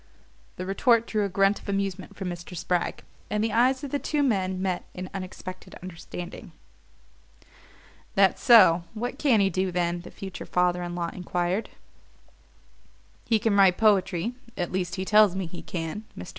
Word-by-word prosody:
The 185 - -5
retort 230 +4 +3
drew 215 -2 0
a - - -2
grunt 195 +2 +2
of - - -10
amusement 195 -1 -3
from 195 - -5
Mr. 175 0 -7
Spragg; 175 +1 -1 0.3
and 210 +2 0
the 225 -1 -1
eyes 255 +4 +3
of 280 - -5
the 285 - 0
two 295 0 0
men 190 -7 0
met 185 -2 -1
in 185 0 -6
unexpected 185 -1 -8
understanding. 175 0 -8 1.6
"That 195 -1 +4
so? 185 -9 +7
What 245 +5 -4
can 250 -8 +4
he 195 -1 +2
do, 185 +1 0
then?" 175 0 -1
the 175 - -11
future 190 -2 -8
father 180 0 +1
in 175 0 -4
law 170 -1 -2
enquired. 180 +3 -2 1.6
"He 225 - +3
can 215 -1 +1
write 195 -2 +5
poetry 200 -1 +2 0.2
at 175 -2 -2
least 185 -1 -2
he 190 -1 -3
tells 210 -2 +5
me 190 -1 -2
he 170 +1 -8
can." 170 +5 -5
Mr. - - -7
190 Hz, 170 wpm, -26 LUFS, 180-215 Hz, 1.6 s, so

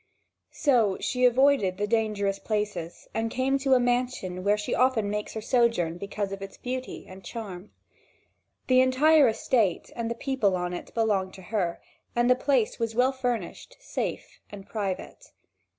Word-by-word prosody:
So 235 -9 +3
she 250 -1 +1
avoided 250 -6 +4
the 205 - 0
dangerous 210 -3 0
places 210 -6 -3
and 225 0 -1
came 265 +3 0
to 270 -1 +3
a - - +4
mansion 245 -7 -1
where 205 +1 +3
she 210 - -3
often 230 -4 +2
makes 210 +1 -4
her 220 - -3
sojourn 225 -8 +1
because 200 0 -4
of 195 0 -6
its 195 0 -8
beauty 255 +1 -5
and 190 +1 -12
charm. 205 -4 -7 1.0
The 255 0 +5
entire 280 +3 +5
estate 220 -4 +1
and 230 -1 -3
the 235 - -2
people 235 -7 0
on 180 0 -2
it 175 - -7
belonged 205 -5 0
to 190 - -12
her, 175 -5 0 0.4
and 240 +1 +3
the - - +6
place 255 -3 +1
was 225 -1 -2
well 250 +2 +4
furnished, 250 - -4
safe, - - -5
and 200 -1 -10
private. 200 -4 -5
225 Hz, 165 wpm, -27 LUFS, 195-255 Hz, 1.0 s, the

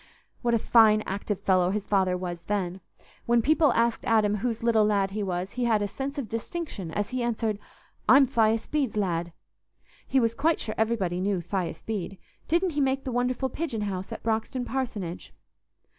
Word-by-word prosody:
What 235 -1 +2
a - - +4
fine 215 -1 +5
active 200 0 -3
fellow 185 -2 +3
his 205 +1 -2
father 190 -3 +2
was 175 -2 -5
then! 190 -2 -2 0.5
When 235 -1 +3
people 305 +1 +4
asked 235 0 +1
Adam 210 -2 +3
whose 230 +1 -2
little 230 -2 +4
lad 200 -2 +1
he 210 +2 -3
was, 185 -1 -2
he 250 -1 -2
had 220 -3 +2
a - - 0
sense 275 +7 -5
of 270 -6 -3
distinction 230 - -5
as 205 +7 -3
he 255 0 -2
answered, 225 -3 -1 0.5
"I'm 270 +3 +8
Thias 225 -2 +2
Bede's 275 -8 -1
lad." 175 -4 -1 0.8
He 265 - +3
was 230 -2 +2
quite 320 +7 +1
sure 215 - -4
everybody 200 -6 0
knew 195 -1 0
Thias 175 -2 -4
Bede—didn't 225 - -2
he 295 -1 -1
make 270 0 +1
the 260 - -4
wonderful 250 +2 0
pigeon 265 -6 -3
house 190 -2 -4
at - - -7
Broxton 225 +3 -1
parsonage? 220 -10 -4
220 Hz, 180 wpm, -27 LUFS, 195-245 Hz, 0.8 s, I'm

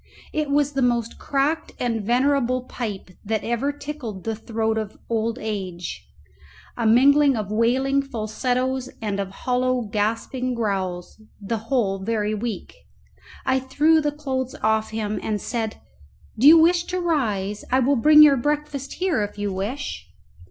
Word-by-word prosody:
It 305 -2 -1
was 285 0 +2
the 275 -1 -1
most 235 -2 0
cracked 285 +4 -1
and 230 -3 -1
venerable 255 +2 +1
pipe 210 -7 -6
that 220 +1 -2
ever 240 +5 0
tickled 285 -9 -7
the 225 -1 -2
throat 220 0 -1
of 215 -2 -6
old 230 0 -1
age, 190 -5 -5 0.7
a 230 -2 0
mingling 275 +3 +5
of 210 -2 -4
wailing 260 +5 +2
falsettos 255 +2 -2
and 205 -3 -3
of 195 -1 -2
hollow 250 +4 0
gasping 230 +4 -2
growls, 190 -4 -3 0.2
the 215 +3 -3
whole 205 -8 +1
very 210 +1 -1
weak. 215 -1 -4 0.7
I 260 - +2
threw 300 +5 +3
the 295 -1 0
clothes 265 -3 -3
off 220 0 +2
him, 215 -1 -3
and 210 -1 -2
said, 225 0 -3 0.6
"Do 240 +5 +4
you 325 +2 +10
wish 345 +2 +4
to 365 +1 -3
rise? 215 - -1
I 255 - +4
will 270 +2 +3
bring 300 +5 +7
your 285 -2 +6
breakfast 290 0 -2
here 360 - 0
if 205 0 -4
you 205 -1 -2
wish." 215 +9 -4
240 Hz, 150 wpm, -23 LUFS, 215-275 Hz, 0.7 s, you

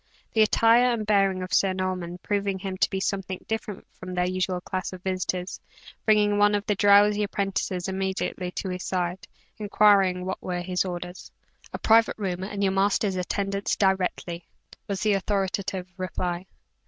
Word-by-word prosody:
The 220 - +3
attire 230 +3 +5
and 220 -2 -3
bearing 195 -3 +2
of 185 - -6
Sir 195 -1 +3
Norman 185 -2 -3
proving 200 -1 -1
him 190 0 -5
to - - +2
be 190 - -2
something 190 -1 -3
different 220 -3 -4
from 185 0 -6
their 180 0 +1
usual 185 0 -1
class 185 +1 -4
of 185 0 -10
visitors, 185 -1 -2 0.5
bringing 210 -1 +3
one 205 0 +4
of 205 0 -2
the 210 - +1
drowsy 205 +1 +5
apprentices 195 -3 -2
immediately 190 -1 -2
to 190 +1 -5
his 180 0 -4
side, 180 0 -2 0.3
inquiring 200 -3 +3
what 190 - -4
were 180 -1 -3
his 180 +1 -1
orders. 180 0 -6 0.4
"A - - -4
private 225 0 +4
room, 185 -4 -3
and 200 +1 -3
your 190 -1 +2
master's 195 0 +1
attendance 195 +2 -1
directly," 185 -3 -1 0.4
was 200 -3 -3
the 215 -1 +3
authoritative 195 -1 -1
reply. 180 -1 -3
190 Hz, 165 wpm, -26 LUFS, 185-205 Hz, 0.5 s, attire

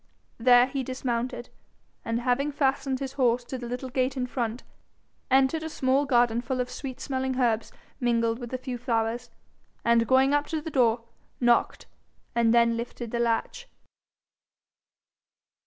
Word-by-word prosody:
There 245 +1 +6
he 270 +1 -3
dismounted, 250 -1 -3 0.5
and 230 +1 -2
having 265 +4 +1
fastened 270 -1 0
his 270 -1 -5
horse 245 -2 +2
to 255 +1 -6
the 240 - -6
little 250 +2 -5
gate 260 +1 -1
in 250 - 0
front, 240 -1 -3 0.7
entered 270 +4 +3
a 320 - -4
small 270 -1 +1
garden 240 -3 +3
full 255 +1 -3
of 250 0 -2
sweet 265 -3 -6
smelling 265 -1 -2
herbs 230 -3 +1 0.3
mingled 230 -2 +1
with 240 -2 -7
a 255 - -2
few 255 -1 -6
flowers, 235 0 -1 0.6
and 235 -1 +4
going 265 +2 +4
up 290 0 +1
to 320 - -2
the 315 +1 -7
door, 235 -4 +2 0.4
knocked, 240 -1 +2 0.5
and 230 -2 +3
then 235 0 +4
lifted 235 -1 -6
the 235 - -2
latch. 235 - -1
250 Hz, 155 wpm, -27 LUFS, 235-265 Hz, 0.7 s, There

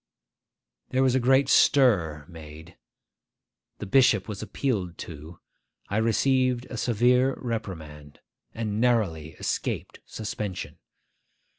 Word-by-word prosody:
There 130 +1 +1
was 130 -2 +3
a 130 - +3
great 130 +2 +3
stir 90 - +3
made, 80 0 -12 1.0
the - - -6
bishop 110 -2 +3
was 105 -3 -6
appealed 100 -11 -3
to, 80 +1 -11 0.5
I 100 - -1
received 125 +2 +1
a 125 - -5
severe 125 +4 +2
reprimand, 80 - -6 0.3
and 110 -1 -3
narrowly 95 -11 0
escaped - - -4
suspension. 105 -3 -6
110 Hz, 105 wpm, -26 LUFS, 85-125 Hz, 1.0 s, was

